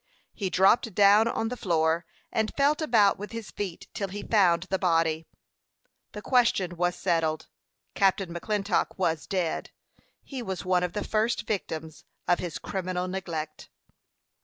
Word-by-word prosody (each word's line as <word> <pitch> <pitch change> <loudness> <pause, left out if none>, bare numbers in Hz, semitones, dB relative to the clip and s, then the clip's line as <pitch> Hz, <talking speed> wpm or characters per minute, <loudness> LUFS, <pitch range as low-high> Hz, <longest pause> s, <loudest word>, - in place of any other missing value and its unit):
He 195 -4 -3
dropped 195 +3 +3
down 205 +2 +6
on 225 -1 -1
the 250 - -4
floor, 165 -4 +1 0.2
and 220 0 0
felt 290 +3 +3
about 220 -10 +4
with 210 +3 -7
his 230 -3 -6
feet, 195 -5 -5
till 200 - -2
he 200 +2 -6
found 175 -6 +3
the 190 0 -2
body. 165 -3 +1 0.9
The 210 - -7
question 230 -8 +2
was 175 +1 0
settled. 165 -4 0 0.5
Captain 195 -2 +1
McClintock 200 +2 -1
was 165 -4 -1
dead. 180 -4 -2 0.5
He 270 -3 -6
was 190 -7 -5
one 185 -1 +2
of 180 -1 -2
the 210 - -2
first 220 +2 0
victims 160 -6 -4 0.2
of 175 - +3
his 170 -5 -4
criminal 185 -1 -3
neglect. 170 -5 -5
190 Hz, 150 wpm, -27 LUFS, 170-210 Hz, 0.9 s, down